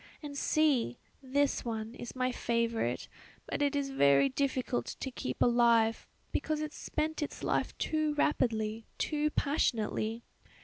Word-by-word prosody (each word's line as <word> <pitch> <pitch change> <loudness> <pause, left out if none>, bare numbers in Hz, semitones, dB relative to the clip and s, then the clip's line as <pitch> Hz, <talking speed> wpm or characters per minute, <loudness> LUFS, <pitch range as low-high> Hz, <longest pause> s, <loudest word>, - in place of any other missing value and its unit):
"And 290 -1 -6
see! 280 - +2 0.2
This 280 +1 +1
one 225 -1 -4
is 240 - -8
my 255 0 +1
favourite, 230 - -1 0.4
but - - -3
it 285 0 +2
is 280 -1 -1
very 140 - +5
difficult 260 - -1
to 265 - -4
keep 255 - -2
alive 235 -2 +4 0.2
because 310 -1 -1
it 305 0 -4
spent 310 +1 -2
its 295 - -4
life - - 0
too 310 -1 0
rapidly, 225 -6 0
too 300 -1 0
passionately. 230 -6 0
255 Hz, 135 wpm, -32 LUFS, 225-290 Hz, 0.4 s, very